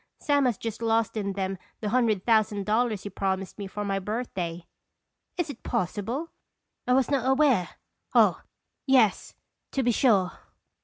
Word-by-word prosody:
Sam 285 -2 +2
has 245 -4 +1
just 225 0 -5
lost 225 -1 +1
in 200 -2 -2
them 190 -1 -3 0.2
the 210 - -2
hundred 220 -5 +1
thousand 215 -3 +2
dollars 215 -2 +1
he 205 - -5
promised 195 0 -2
me 200 - -4
for 205 +2 -5
my 195 -1 0
birthday." 185 -5 -4 0.7
"Is 345 -5 -1
it 240 - -13
possible? 235 - -2 0.6
I 250 - +4
was 265 +1 +2
not 265 -2 +1
aware 265 - +3 0.5
oh, - - +5 0.5
yes, 255 -7 +3 0.4
to 270 - +1
be 245 - +3
sure." 205 -7 +3
220 Hz, 155 wpm, -27 LUFS, 195-250 Hz, 0.7 s, oh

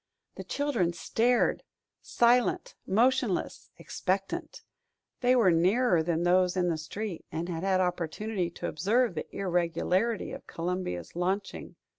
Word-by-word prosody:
The - - -8
children 275 -13 -1
stared, 235 +8 +1 0.4
silent, 245 - +2
motionless, 240 +7 +1
expectant. 195 - -3 0.6
They 250 0 +3
were 220 -7 +5
nearer 180 +3 +3
than 165 +1 -1
those 180 +1 +3
in 180 -1 +2
the 165 - 0
street 190 +4 -5
and 165 +2 -3
had 165 -2 -4
had 190 0 +2
opportunity 180 +2 -2
to 170 - -6
observe 220 +7 +1
the 155 - -5
irregularity 185 +4 0
of - - -9
Columbia's 165 - -4
launching. 190 +3 -3
185 Hz, 125 wpm, -29 LUFS, 170-225 Hz, 0.6 s, were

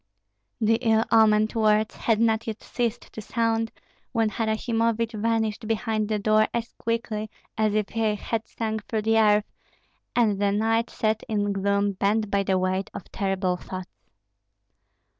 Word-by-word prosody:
The 225 0 +3
ill 225 -2 +3
omened 215 -1 +4
words 215 -1 +2
had 225 -2 +1
not 225 0 +2
yet 220 -1 -5
ceased 240 -1 -3
to 220 - -6
sound 225 +1 0 0.4
when 225 -3 +1
Harasimovich 225 +1 0
vanished 220 0 -1
behind 220 -1 -1
the 215 - +1
door 215 +1 +3
as 235 0 -3
quickly 225 -2 -2 0.3
as 215 -1 +1
if 210 -2 0
he 220 -2 0
had 225 +2 -3
sunk 220 -2 -4
through 220 -1 -1
the 225 +1 +3
earth, 210 -1 +4 0.7
and 210 -5 +2
the 200 -1 +3
knights 225 +3 0
sat 215 0 0
in 205 -2 0
gloom 200 +1 +1
bent 200 +2 0
by 200 - +2
the 190 -1 +1
weight 185 +1 -1
of - - -9
terrible 195 -2 -1
thoughts. 185 0 -9
220 Hz, 155 wpm, -25 LUFS, 205-225 Hz, 0.7 s, omened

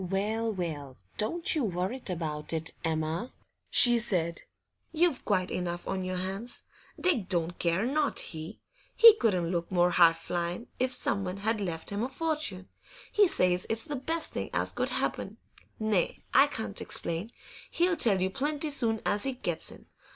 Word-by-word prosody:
'Well, 210 +5 -1
well, 155 -9 -5 0.2
don't 330 +11 +1
you 305 - 0
worrit 190 +5 -2
about 155 -3 -2
it, 160 0 -1
Emma,' 160 +6 -1 0.4
she 240 -3 +6
said; 170 -7 0 0.5
'you've 330 -4 +1
quite 185 -3 0
enough 175 -1 -3
on 190 -1 -2
your 185 0 -3
hands. 195 +6 -5 0.4
Dick 280 - +1
don't 175 -2 -1
care 170 +5 +1
not 290 +3 0
he; 160 +5 -5 0.4
he 460 -1 +10
couldn't 180 - +1
look 170 0 -2
more 180 -1 +3
high 170 -2 +6
flyin' 175 +5 -3
if 255 0 +1
someone 195 -6 -1
had 215 +2 -1
left 170 -3 -4
him 200 +1 -2
a 245 - -1
fortune. 295 - -2 0.4
He 415 -2 +5
says 180 - +2
it's 225 0 -1
the 295 - -4
best 320 +5 -2
thing - - -3
as - - +1
could - - -1
happen. - - -2 0.4
Nay, 215 -5 +1 0.2
I 275 +2 +7
can't 220 -7 -5
explain; 170 +6 -4 0.4
he'll 350 0 +2
tell 225 - +2
you 190 - 0
plenty 295 +4 -2
soon 230 -6 +1
as 205 - +1
he 270 +3 -1
gets 175 -10 -3
in. - - -14
195 Hz, 165 wpm, -29 LUFS, 175-250 Hz, 0.5 s, he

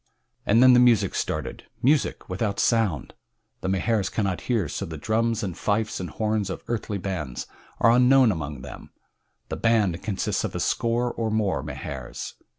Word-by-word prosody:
And 115 +4 +5
then 130 -1 +8
the 125 - +6
music 115 -6 +4
started - - -3 0.2
music 145 +3 +2
without 100 +2 -2
sound! 110 - +1 0.5
The 95 - -3
Mahars 95 +1 +1
cannot 100 -5 -1
hear, 110 -9 +1
so - - -4
the 80 -1 -6
drums 115 +6 0
and 95 -4 -3
fifes 110 +1 -1
and 90 -2 -4
horns 110 +1 -1
of - - -6
earthly 110 -3 -2
bands 85 -10 -4 0.3
are 115 - +5
unknown 125 0 +5
among 75 -6 -5
them. 65 - -10 0.6
The - - -3
"band" 105 -7 +2
consists 100 -3 -1
of - - -4
a - - -2
score 120 +1 0
or 115 -1 -2
more 105 -9 0
Mahars. 70 -2 -6
105 Hz, 165 wpm, -25 LUFS, 90-115 Hz, 0.6 s, then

